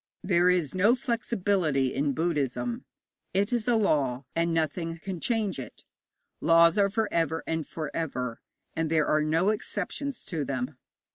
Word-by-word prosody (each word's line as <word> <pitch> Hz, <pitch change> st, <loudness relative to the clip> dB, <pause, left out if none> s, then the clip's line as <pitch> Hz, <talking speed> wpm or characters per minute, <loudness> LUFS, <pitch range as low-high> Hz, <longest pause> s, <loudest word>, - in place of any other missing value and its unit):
There 180 Hz, -1 st, +3 dB
is 175 Hz, -6 st, +1 dB
no 205 Hz, +6 st, +4 dB
flexibility 195 Hz, -, 0 dB
in 140 Hz, 0 st, 0 dB
Buddhism. 130 Hz, -7 st, -1 dB, 0.5 s
It 200 Hz, +5 st, +1 dB
is 235 Hz, -2 st, 0 dB
a 240 Hz, -, +4 dB
law, 140 Hz, -, +1 dB
and 170 Hz, 0 st, +1 dB
nothing 165 Hz, +1 st, -1 dB
can 185 Hz, +1 st, -6 dB
change 215 Hz, -, 0 dB
it. 130 Hz, -, -9 dB, 0.6 s
Laws 165 Hz, 0 st, +5 dB
are 200 Hz, 0 st, +4 dB
for 220 Hz, +2 st, 0 dB
ever 165 Hz, -1 st, 0 dB
and 160 Hz, -1 st, -2 dB
for 155 Hz, -2 st, -5 dB
ever, 125 Hz, -7 st, -3 dB, 0.3 s
and 165 Hz, -1 st, 0 dB
there 155 Hz, -2 st, +3 dB
are 155 Hz, -, +2 dB
no 165 Hz, +5 st, +2 dB
exceptions 215 Hz, +6 st, -3 dB
to 160 Hz, -5 st, -2 dB
them. 130 Hz, 0 st, -4 dB
165 Hz, 155 wpm, -28 LUFS, 150-200 Hz, 0.6 s, Laws